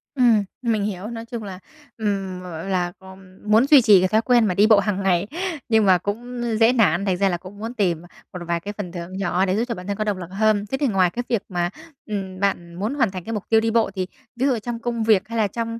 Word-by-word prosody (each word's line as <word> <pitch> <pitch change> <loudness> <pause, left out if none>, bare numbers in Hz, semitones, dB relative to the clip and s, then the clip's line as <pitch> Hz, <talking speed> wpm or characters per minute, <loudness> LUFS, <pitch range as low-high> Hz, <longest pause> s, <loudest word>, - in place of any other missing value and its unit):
Ừm, 235 -5 +4 0.2
mình 225 -4 0
hiểu. 205 0 -4
Nói 230 -1 -6
chung 230 -2 -6
là, 190 -2 -7 0.4
ừm 195 -4 -2
m - - -10 0.3
là 180 -2 0
co 190 0 -13 0.3
muốn 220 +4 +4
duy 285 -3 +8
trì 210 -4 +6
cái 185 - +3
thói 215 +3 +2
quen 240 -2 +3
mà 185 - +1
đi 205 +4 +4
bộ 215 -3 +6
hàng 200 -1 -1
ngày 185 +1 +2 0.4
nhưng 220 -2 +4
mà 185 -2 +6
cũng 240 +6 -5 0.2
dễ 230 +2 +5
nản, 195 -5 +2
thành 185 -2 0
ra 195 0 +2
là 175 - -1
cũng 190 +4 -12
muốn 225 +3 -5
tìm 180 -8 0 0.3
một 180 - -6
vài 170 0 0
cái 205 +4 -6
phần 180 -4 -5
thưởng 175 +2 -7
nhỏ 190 0 +1
để 185 +1 0
giúp 225 - +1
cho 235 - -3
bản 180 0 -9
thân 200 - -2
có 215 - 0
động 205 -3 -1
lực 180 -1 -8
hơn. 210 0 +2
Thế 265 - 0
thì 280 - +1
ngoài 190 -4 +3
cái 245 +6 -4
việc 230 -5 +1
mà, 175 -1 -1 0.4
ừm, 190 -3 -5
bạn 175 -4 -1
muốn 210 +9 -2
hoàn 230 -9 +1
thành 185 -2 -6
cái 225 - -5
mục 210 - -3
tiêu 225 -1 +5
đi 225 0 0
bộ 225 -3 +2
thì 185 -1 -2 0.3
ví 255 +3 0
dụ 250 -5 +2
trong 235 +1 -5
công 235 -1 -2
việc 215 -2 +3
hay 230 0 -4
là 215 - +2
trong, 230 +2 -4
205 Hz, 275 wpm, -22 LUFS, 185-225 Hz, 0.4 s, duy